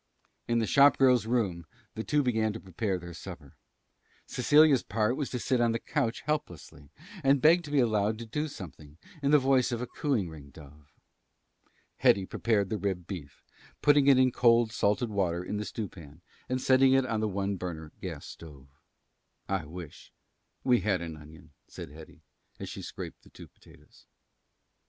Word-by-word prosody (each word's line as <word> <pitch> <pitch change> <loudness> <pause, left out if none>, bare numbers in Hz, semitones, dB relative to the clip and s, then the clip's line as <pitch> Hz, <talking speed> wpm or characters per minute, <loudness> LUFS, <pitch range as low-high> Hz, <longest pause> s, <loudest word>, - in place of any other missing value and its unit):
In 120 - +1
the 115 - +1
shop 140 +5 +5
girl's 125 -4 +4
room 95 -9 -1 0.3
the 110 - -5
two 150 +3 +1
began 110 -4 0
to 110 - -7
prepare 95 +1 -3
their 85 0 -9
supper. - - -10 0.7
Cecilia's 145 +1 +4
part 110 +4 0
was 145 -1 -3
to 125 - -3
sit 125 +1 0
on 115 -1 +2
the 115 - -1
couch 120 -4 -2
helplessly 85 - -5 0.3
and 135 +1 +4
beg 165 +6 +5
to - - -8
be 145 - 0
allowed 110 -3 +1
to 115 - -7
do 150 +8 -3
something, 75 - -11 0.2
in 140 - +1
the 150 - +7
voice 130 -2 +2
of 120 - -2
a 125 - -3
cooing 125 - -1
ring 75 -4 -11
dove. 70 0 -16 1.1
Hetty 95 -1 +3
prepared 100 -1 0
the 110 - -1
rib 95 -4 -2
beef, 80 -8 -9 0.4
putting 145 -1 +5
it 135 -2 +7
in 130 -1 +4
cold 115 -2 +3
salted 110 +2 0
water 90 -4 -1
in 105 - -4
the 105 - -3
stew 110 -1 -4
pan 80 -3 -14 0.3
and 130 0 0
setting 130 +1 +4
it 135 -1 +3
on 115 -3 -1
the 110 0 0
one 100 0 -2
burner 80 -4 -6
gas - - -6
stove. 70 -5 -12 0.8
"I 95 -5 -2
wish 85 -1 -10 0.5
we 125 -2 +4
had 95 -5 0
an 80 -2 -6
onion," 75 +1 -15 0.2
said - - -9
Hetty, 80 +1 -14 0.4
as - - -6
she - - -7
scraped - - -8
the - - -19
two - - -13
potatoes. - - -21
110 Hz, 180 wpm, -29 LUFS, 85-130 Hz, 1.1 s, the